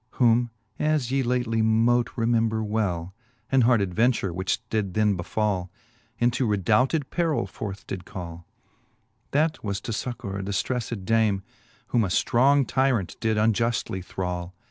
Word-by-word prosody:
Whom 120 -1 +3 0.3
('as 150 -5 +1
ye 135 0 +2
lately 120 -3 0
mote 115 +2 +3
remember 115 -2 +1
well) 95 -5 -1 0.4
An 135 -1 +5
hard 120 -2 +4
adventure, 100 0 +1
which 95 +5 -2
did 100 -5 -1
then 105 -2 +3
befall, 95 0 -1 0.5
Into 120 +1 +1
redoubted 115 - +2
perill 165 -4 +1
forth 100 -2 -7
did 95 -2 -5
call; 85 -2 -8 0.8
That 155 +2 +1
was, 100 -2 -2
to 115 - -5
fuccour 105 -3 -4
a - - -4
diftrejGTed 105 +1 -2
dame, 110 -3 +2 0.5
Whom 120 -2 +2
a - - 0
ftrong 130 +8 +3
tyrant 130 -8 +1
did 110 -1 0
unjuftJy 110 -3 +1
thrall. 90 -1 -4
110 Hz, 140 wpm, -25 LUFS, 95-120 Hz, 0.8 s, An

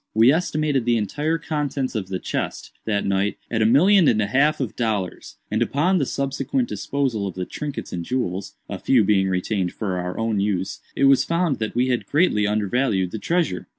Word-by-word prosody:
We 115 +4 +6
estimated 155 -5 0
the 120 -1 +3
entire 150 +10 -1
contents 145 -5 -2
of 105 -5 -3
the 95 -1 -3
chest, - - -4
that 105 -2 0
night, 100 +1 0
at 115 -2 0
a 110 - +4
million 175 - +5
and 110 - +3
a 105 - +2
half 140 +8 +2
of 130 -6 -3
dollars; 105 -6 -3
and 110 +2 0
upon 165 +10 +2
the 140 - 0
subsequent 140 - -1
disposal 130 - -2
of 95 - -6
the 90 -1 -3
trinkets 145 +5 -6
and 85 -1 -3
jewels 100 -4 -3
(a - - -5
few 125 -5 +3
being 95 -2 +2
retained 95 0 -1
for 95 -4 -3
our 90 0 -4
own 115 -2 0
use), 95 -2 -1 0.2
it - - 0
was 135 -1 +6
found 170 -5 0
that 110 0 -3
we 125 +2 +2
had 125 -1 -1
greatly 145 -10 +2
undervalued 105 -2 0
the 110 - -5
treasure. 165 - -1
115 Hz, 200 wpm, -23 LUFS, 100-140 Hz, 0.2 s, We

